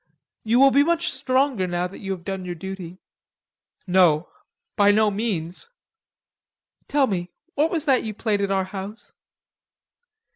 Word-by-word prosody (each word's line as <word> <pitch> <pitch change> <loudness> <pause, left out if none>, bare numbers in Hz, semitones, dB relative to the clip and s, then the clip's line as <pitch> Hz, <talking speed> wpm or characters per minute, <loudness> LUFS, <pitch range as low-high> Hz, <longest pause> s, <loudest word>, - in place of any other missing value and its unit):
You 230 +3 +2
will 275 0 +7
be 280 +1 +5
much 340 +2 +1
stronger 255 -7 0
now 175 0 -1
that 180 - -8
you 195 - -7
have 180 -2 -9
done 195 -1 -4
your 180 -1 -5
duty." 185 0 -7 0.9
"No... 180 -4 +3 0.5
by 205 0 +4
no 210 0 +4
means." 195 - -3 1.2
"Tell 285 -1 +3
me, 180 -6 -3 0.2
what 300 +3 +2
was 325 -3 0
that 270 -4 +3
you 215 -2 -5
played 210 -2 -1
at 200 - 0
our 195 -1 +1
house?" 195 +3 -8
200 Hz, 150 wpm, -23 LUFS, 185-255 Hz, 1.2 s, will